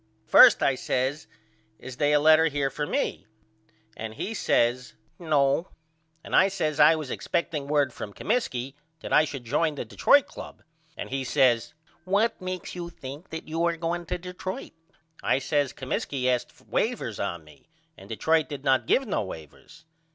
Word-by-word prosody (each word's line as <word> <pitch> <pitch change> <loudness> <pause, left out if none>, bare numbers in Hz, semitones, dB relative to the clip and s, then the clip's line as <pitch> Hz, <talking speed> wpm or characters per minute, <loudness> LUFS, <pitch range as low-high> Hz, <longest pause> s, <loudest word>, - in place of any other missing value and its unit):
First - - +7
I 135 - +3
says 130 +3 -2 0.5
Is 130 -1 -10
they 145 -1 +2
a 150 - +4
letter 160 +2 +5
here 140 -3 -1
for 150 -1 -3
me? 100 - -2 0.7
And 110 0 -7
he 225 - -4
says 125 - 0 0.2
No. 150 0 +1 0.6
And - - -3
I 190 - +6
says 155 -6 -2
I 150 +2 +7
was 155 -4 -5
expecting 155 -4 -2
word 145 -4 +1
from 105 - -7
Comiskey 130 - -2 0.3
that - - -5
I 155 - +6
should 135 -4 -7
join 155 +6 0
the 140 - -5
Detroit 280 - +4
Club - - -11 0.3
and - - -6
he 135 0 -2
says 130 -3 +2 0.3
What 200 +5 0
makes 185 0 -5
you 175 -1 -6
think 145 +2 -10
you 160 +1 -4
are 170 -1 0
going 170 +1 -3
to - - -2
Detroit? 180 +1 -7 0.5
I - - +2
says 140 0 0
Comiskey 130 0 -3
asked 125 -1 -1
wavers - - -2
on 85 -2 -3
me 75 - -20 0.3
and - - -15
Detroit 160 -1 +1
did 140 -2 -7
not 135 -2 +2
give 270 - +3
no 200 - 0
wavers. 80 - -11
145 Hz, 165 wpm, -26 LUFS, 130-165 Hz, 0.7 s, First